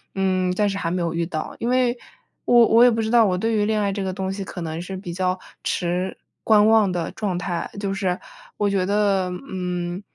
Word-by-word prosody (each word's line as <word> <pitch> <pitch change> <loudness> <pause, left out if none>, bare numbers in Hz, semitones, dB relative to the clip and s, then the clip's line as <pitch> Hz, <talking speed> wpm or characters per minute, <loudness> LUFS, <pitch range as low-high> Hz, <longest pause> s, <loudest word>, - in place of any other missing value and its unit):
嗯， 185 -1 +1
暂 205 +2 +1
时 195 - -3
还 165 -4 -2
没 180 0 -1
有 170 -1 -1
遇 170 0 -1
到。 155 -3 -5
因 235 - -1
为 250 -1 +2 0.5
我 240 -1 +6
我 230 +2 +6
也 245 - +8
不 225 -1 -1
知 220 0 -1
道 235 -2 +6
我 180 -1 0
对 225 +4 0
于 210 -1 +2
恋 215 0 +1
爱 200 -1 0
这 200 - -3
个 190 - -2
东 190 +1 -3
西 195 0 -5
可 185 -1 -7
能 160 0 -4
是 190 +2 -6
比 180 -2 -7
较 185 +1 -1 0.2
持 180 +1 -1 0.3
观 215 -1 +5
望 220 -3 +4
的 175 -2 -3
状 195 -5 -3
态， 175 -1 -3
就 200 -1 -2
是 190 -2 -1 0.4
我 205 - +1
觉 195 -2 +1
得， 200 -1 +1 0.2
嗯， 180 -1 -3
190 Hz, 250 characters per minute, -23 LUFS, 180-210 Hz, 0.5 s, 也